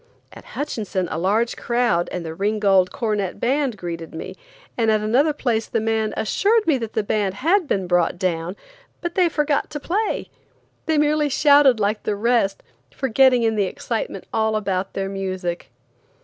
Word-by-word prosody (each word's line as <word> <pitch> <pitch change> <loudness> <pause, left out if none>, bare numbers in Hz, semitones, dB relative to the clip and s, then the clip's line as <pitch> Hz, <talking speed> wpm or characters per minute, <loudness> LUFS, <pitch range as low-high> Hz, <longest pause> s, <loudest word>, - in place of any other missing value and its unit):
At - - -12
Hutchinson 210 -10 -2
a 160 - -2
large 215 +6 +1
crowd 235 -8 0
and 180 -2 -4
the 160 - -5
Ringgold 195 0 +2
Cornet 210 -5 -2
Band 260 -1 0
greeted 165 -3 -6
me, - - -7 0.4
and 225 -2 +1
at 215 -1 +3
another 250 +9 +2
place 235 -6 -1
the - - -1
mayor 220 0 0
assured 425 - +2
me 290 -5 +2
that 225 -2 -5
the 220 - 0
band 205 -2 -1
had 335 - +2
been 190 -8 0
brought 175 -1 +1
down, 175 -1 -2 0.4
but 345 -1 -4
they 360 -2 +3
forgot 295 -2 0
to 295 - -5
play. 405 +9 -2 0.6
They 320 -1 +2
merely 300 0 +2
shouted 285 -3 +5
like 210 +1 0
the 210 - -2
rest, 220 -2 +1 0.3
forgetting 260 -1 +3
in 225 -1 +2
the 205 -2 +1
excitement 345 - -4
all 220 0 +1
about 195 -3 -2
their 195 0 -2
music. 185 -3 -4
220 Hz, 170 wpm, -22 LUFS, 195-275 Hz, 0.6 s, shouted